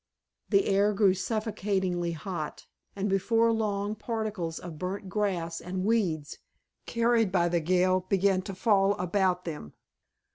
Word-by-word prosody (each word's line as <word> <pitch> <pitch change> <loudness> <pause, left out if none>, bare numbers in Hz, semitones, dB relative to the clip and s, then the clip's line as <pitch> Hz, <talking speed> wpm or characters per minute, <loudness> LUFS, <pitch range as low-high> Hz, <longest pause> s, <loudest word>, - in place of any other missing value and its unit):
The 395 0 +4
air 200 +2 +3
grew 200 -2 +4
suffocatingly 190 -4 -1
hot, 165 -2 -5 0.3
and 200 0 -1
before 225 +4 +2
long 205 -2 -1
particles 215 -7 -3
of 165 -4 -8
burned 185 +1 -4
grass 175 -5 -1
and 185 +1 -3
weeds, 175 -10 0 0.5
carried 230 -3 +2
by 175 -2 +2
the 170 0 +1
gale, 185 +3 +2
began 195 -1 +3
to 195 - -5
fall 195 0 +3
about 180 0 0
them. 150 - -6
195 Hz, 135 wpm, -28 LUFS, 180-210 Hz, 0.5 s, The